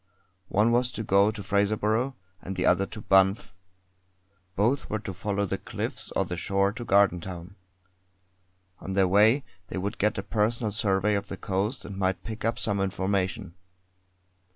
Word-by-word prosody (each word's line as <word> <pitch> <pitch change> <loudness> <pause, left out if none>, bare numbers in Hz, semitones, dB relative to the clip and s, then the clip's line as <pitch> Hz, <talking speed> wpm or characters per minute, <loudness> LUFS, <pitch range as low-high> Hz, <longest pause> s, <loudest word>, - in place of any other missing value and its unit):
One 105 +5 +3
was 125 +1 +2
to 110 - -4
go 100 0 +4
to 110 -2 -6
Fraserburgh, 110 +6 +1 0.3
and 95 - -6
the 90 - -1
other 95 +2 +3
to 110 - -8
Banff. 95 +1 +3 1.0
Both 120 +8 +1
were 110 - -1
to 100 -2 -6
follow 100 +2 -1
the 95 - -3
cliffs - - -4
or - - +2
the 90 - -5
shore 100 +2 +1
to 120 - -6
Gardentown. 95 -3 +1 1.2
On 95 - -5
their 95 -1 +3
way 110 +8 +4 0.2
they - - -5
would 100 +3 -3
get 105 +1 +1
a 100 - -2
personal 110 +1 0
survey 100 -1 +1
of 100 -1 -1
the 100 - -6
coast 105 +6 -2
and 95 -1 -7
might 95 -1 0
pick 110 0 -7
up 115 +1 0
some 100 -2 -1
information. 95 0 -1
100 Hz, 165 wpm, -27 LUFS, 95-110 Hz, 1.2 s, go